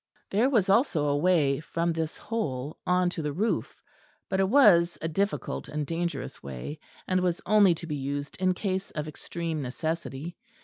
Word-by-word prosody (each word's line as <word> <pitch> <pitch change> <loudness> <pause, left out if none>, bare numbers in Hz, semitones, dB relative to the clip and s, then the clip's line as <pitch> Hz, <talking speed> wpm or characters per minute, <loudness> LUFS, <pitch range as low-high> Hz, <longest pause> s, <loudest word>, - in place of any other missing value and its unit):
There 225 +7 +3
was 220 -8 +3
also 195 - +3
a 145 - +2
way 150 -4 +3
from 170 +2 -1
this 160 -1 -3
hole 150 - -3
on 180 0 +3
to 170 - -4
the 150 -1 -2
roof, 210 +9 -1 0.5
but 190 - 0
it 190 0 +3
was 190 -10 +6
a 165 - -2
difficult 195 +5 -2
and 150 0 -2
dangerous 165 -4 -3
way; 70 - -6 0.3
and 185 0 +2
was 180 -1 0
only 200 -3 +5
to 165 - -7
be 150 -3 -3
used 140 +1 -4
in 185 0 +2
case 190 0 -2
of 150 -1 -4
extreme 160 +1 -4
necessity. 160 +3 -4
170 Hz, 175 wpm, -28 LUFS, 150-190 Hz, 0.5 s, was